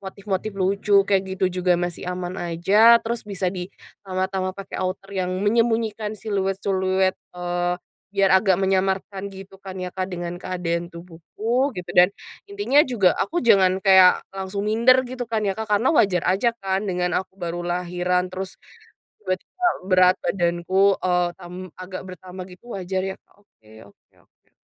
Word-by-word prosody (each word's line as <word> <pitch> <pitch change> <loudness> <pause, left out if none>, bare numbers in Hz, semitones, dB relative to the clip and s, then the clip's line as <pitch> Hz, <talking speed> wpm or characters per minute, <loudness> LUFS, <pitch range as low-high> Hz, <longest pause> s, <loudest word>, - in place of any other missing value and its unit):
motif-motif 200 +1 -4
lucu 200 +2 +1
kayak 195 -2 +3
gitu 185 -1 0
juga 180 -1 +3
masih 175 0 -4
aman 180 0 -4
aja, 195 +7 +5
terus 235 0 -2
bisa 195 -2 -2
ditambah-tambah 185 0 -4
pake - - -13
outer 185 +1 -4
yang 185 -2 -1
menyembunyikan 225 -1 +1
siluet-siluet, 190 -2 0 0.2
eee, 175 0 -1 0.4
biar 195 -1 +3
agak 190 0 +4
menyamarkan 190 +1 0
gitu 195 0 -11
kan 190 -1 -9
ya 180 -1 -5
Kak, 185 0 -3
dengan 175 -1 -5
keadaan 175 -2 -3
tubuhku 185 - -3
gitu 180 -1 -7
dan, 180 +3 +5 0.3
intinya 405 -8 +1
juga 205 -8 +3
aku 345 -1 -1
jangan 190 -4 +4
kayak 190 -2 +6
langsung 195 +1 -4
minder 235 +5 +4
gitu 250 -1 -6
kan 220 -1 -1
ya 200 - +1
Kak, 220 - -3
karena 230 +9 +2
wajar 195 - +3
aja 230 +5 +1
kan 195 +2 -1
dengan 180 -2 -1
aku 190 0 -8
baru 175 -1 -5
lahiran 180 +1 -1
terus, 190 +1 -5 0.7
tiba-tiba 355 - -3 0.2
berat 185 0 +5
badanku, 185 +2 +1
eee, 180 -1 +1
tam 175 0 -10 0.3
agak 185 0 -7
bertambah 185 0 -9
gitu 180 - -17
wajar 185 0 -2
ya 190 - -5
Kak, - - -31
oke 110 - -26 0.2
oke - - -56 0.2
oke. - - -43
190 Hz, 155 wpm, -23 LUFS, 180-200 Hz, 0.7 s, kayak